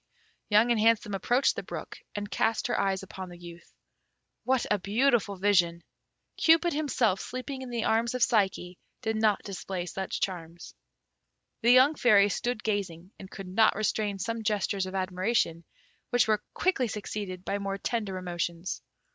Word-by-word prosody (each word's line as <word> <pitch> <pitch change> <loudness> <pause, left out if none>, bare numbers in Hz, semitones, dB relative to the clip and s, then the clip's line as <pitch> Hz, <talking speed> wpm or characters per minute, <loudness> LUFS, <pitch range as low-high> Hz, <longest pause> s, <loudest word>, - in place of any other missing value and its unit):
Young 215 +3 +5
and 235 - +2
Handsome 220 -2 +3
approached 245 +7 +2
the - - -3
brook, - - -8 0.2
and 205 0 -5
cast 225 +2 0
her - - 0
eyes 195 -1 0
upon 190 -1 -8
the 175 - -11
youth. 170 0 -12 0.7
What 260 -1 +2
a 210 - +3
beautiful 215 +1 +1
vision! 175 -3 +2 0.5
Cupid 330 +1 +4
himself 260 -10 +1
sleeping 260 +1 -6
in 260 - -7
the 235 -2 -2
arms 230 +2 +1
of 250 - +2
Psyche 190 -6 +1 0.2
did 220 0 -1
not 215 -1 +2
display 190 -2 -5
such 190 +1 -4
charms. 170 -2 -5 0.9
The 235 - +3
young 260 +4 +7
Fairy 210 -8 +5
stood 240 +2 -2
gazing, 190 -4 -3
and 190 - -10
could 195 -1 -8
not 215 +4 +3
restrain 210 -1 -1
some 230 +3 -3
gestures 205 -2 0
of 185 - -7
admiration, 185 -2 0 0.4
which 245 -2 +3
were 215 -1 +2
quickly 350 -9 +1
succeeded 205 -3 -5
by 200 - -1
more 195 0 -3
tender 205 -3 -2
emotions. 175 0 -4
205 Hz, 160 wpm, -28 LUFS, 185-230 Hz, 0.9 s, young